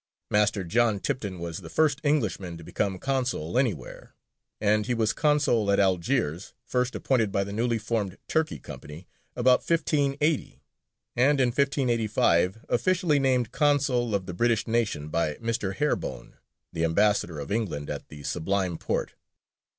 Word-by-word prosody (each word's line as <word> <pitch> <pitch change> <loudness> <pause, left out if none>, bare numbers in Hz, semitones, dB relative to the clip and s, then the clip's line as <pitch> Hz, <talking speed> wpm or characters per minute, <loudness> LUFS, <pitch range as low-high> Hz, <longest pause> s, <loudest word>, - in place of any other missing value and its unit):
Master 105 -1 +2
John 110 +3 +2
Tipton 105 -7 -3
was 85 -1 -5
the - - -10
first 150 -2 +2
Englishman 110 - 0
to 85 - -11
become 95 +3 -2
consul 125 - -2
anywhere, 110 - -2 0.4
and 105 +1 +2
he 125 - +1
was 110 -2 +1
consul 145 -8 +2
at 100 - +3
Algiers, 95 - 0
first 125 0 -1
appointed 115 -6 +1
by 100 - +1
the 100 +1 -6
newly 115 +2 0
formed 105 -3 -2
Turkey 160 0 0
Company 80 +5 -10 0.3
about 125 +1 +4
1580, 150 -2 0 0.5
and 135 +4 +3
in 125 -2 +4
1585 115 - +1
officially 175 +1 +2
named 130 -4 +1
consul 135 -6 +2
of 95 -2 -2
the 90 - -6
British 115 +4 +1
nation 110 -10 -1
by 75 -1 0
Mr. 115 -4 -2
Harebone, 150 +5 -2 0.4
the 80 - -1
ambassador 85 -1 +2
of 70 - -6
England 95 -10 -2
at - - -6
the 75 -1 -11
Sublime 90 +2 -1
Porte. - - -2
115 Hz, 145 wpm, -27 LUFS, 95-130 Hz, 0.5 s, about